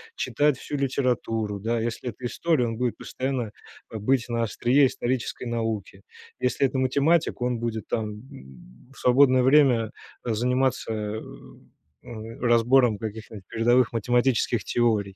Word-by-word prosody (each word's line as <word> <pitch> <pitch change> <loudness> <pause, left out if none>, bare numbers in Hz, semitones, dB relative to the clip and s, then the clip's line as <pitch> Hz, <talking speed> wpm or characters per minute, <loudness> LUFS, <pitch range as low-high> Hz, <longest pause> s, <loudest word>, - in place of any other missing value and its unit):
читать 145 -2 +1
всю 145 - -5
литературу, 120 -6 -1
да. 115 +3 -1
Если 120 +2 -3
это 120 +3 -9
история, 145 +1 +1
он 115 -1 -4
будет 125 -2 -1
постоянно, 130 -5 -3 0.4
а, 110 - -6
быть 125 +2 +1
на 115 0 0
острие 130 +5 +3
исторической 125 -1 -3
науки. 110 -4 -3 0.4
Если 125 +2 +1
это 130 - -4
математик, 140 +3 +1
он 125 -1 0
будет 115 -2 -4
там, 110 -2 -2 0.2
м, 65 - -15
в - - -19
свободное 130 0 +5
время 130 -5 +4 0.3
заниматься, 125 +1 0
э, 105 0 -4 0.8
м, 115 0 -9
разбором 120 -1 +4
каких-нибудь 110 -2 -8
передовых 120 +1 +2
математических 120 0 +1
теорий. 105 -5 0
120 Hz, 135 wpm, -25 LUFS, 110-130 Hz, 0.8 s, свободное